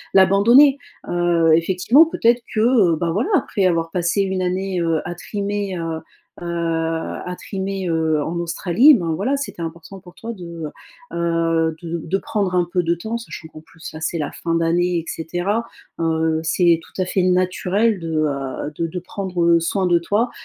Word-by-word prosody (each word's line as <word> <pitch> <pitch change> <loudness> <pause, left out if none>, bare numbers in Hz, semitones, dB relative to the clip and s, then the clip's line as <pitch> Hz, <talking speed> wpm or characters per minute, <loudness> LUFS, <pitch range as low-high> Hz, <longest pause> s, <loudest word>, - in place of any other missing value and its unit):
l'abandonner, 235 +9 +6 0.3
heu, 175 -2 +2
effectivement, 190 - +4
peut-être 240 -6 +2
que, 215 - +2
heu, 220 -9 +4
ben, 170 +1 -1
voilà, 215 - -1
après 200 - 0
avoir 165 -1 0
passé 180 +3 0
1 190 -1 -1
année, 185 0 -1
heu, 165 -2 +1
à 175 - -3
trimer, 200 0 -3
heu 165 -1 -3 0.4
heu, 175 - -6
à 165 +1 -2
trimer, 195 -1 -4
heu, 160 -2 +1
en 165 - -4
Australie, 175 - +4
ben 170 -6 -1
voilà 245 - 0
c'était 275 -11 -6
important 170 +4 -7
pour 175 -1 -16
toi 230 +1 -6
de, 170 -4 -8 0.5
heu, 165 -1 0
de 170 0 -3
de 190 +4 -1
prendre 195 -3 -2
un 175 -1 +2
peu 180 - +3
de 170 0 0
temps 220 +7 -4
sachant 220 -8 -9
qu'en 155 0 -12
plus 160 0 -11
là 155 - -8
c'est 165 +1 -2
la 150 - -3
fin 165 0 -3
d'année 175 +2 +1
et 165 - -3
cetera, 175 +7 -2 0.4
heu, 160 -1 +1
c'est 165 +1 +3
tout 185 - -14
à 185 - +1
fait 185 0 0
naturel 185 +3 +1
de, 165 -1 -5
heu, 140 0 -3
de 165 - 0
de 180 +2 -5
prendre 175 -2 0
soin 185 +3 -1
de 175 -1 +3
toi 210 +8 0
175 Hz, 180 wpm, -20 LUFS, 165-195 Hz, 0.5 s, l'abandonner